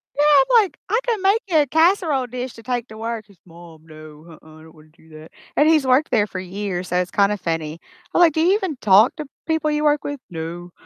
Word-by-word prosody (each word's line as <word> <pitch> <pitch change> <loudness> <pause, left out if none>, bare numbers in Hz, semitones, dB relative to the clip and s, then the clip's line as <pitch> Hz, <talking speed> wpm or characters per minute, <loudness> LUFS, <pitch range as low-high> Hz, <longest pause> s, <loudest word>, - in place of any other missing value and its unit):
Yeah, 290 - 0 0.2
I'm 450 - +4
like, 385 - -8
"I 445 - +2
could 455 -5 -1
make 395 +4 +2
you 345 -4 +1
a 290 - +2
casserole 320 -3 +2
dish 250 +1 -6
to 230 - -14
take 245 -1 -3
to 220 - -12
work." 225 -1 -5
He's, 200 -4 -22
"Mom, 165 -2 -16
no, 155 -1 -14 0.2
uh-uh, 155 0 -17
I - - -16
don't 160 0 -17
wanna 155 0 -20
do 160 - -22
that." 155 0 -14 0.2
And 295 - +3
he's 310 -4 +3
worked 260 +4 +2
there 210 -2 +2
for 190 - -7
years, 185 -1 -5
so 180 - -1
it's 180 0 -2
kinda 205 +1 +1
funny. 165 -3 -4 0.3
I'm - - +1
like, 335 -3 +5
"Do 315 - 0
you 360 +4 +3
even 375 -9 -3
talk 210 +2 +4
to 305 - -6 0.2
people 320 -1 0
you 300 0 -1
work 295 -1 +2
with?" 285 -1 -5
"No." 170 +1 -7
225 Hz, 250 wpm, -20 LUFS, -, 0.3 s, like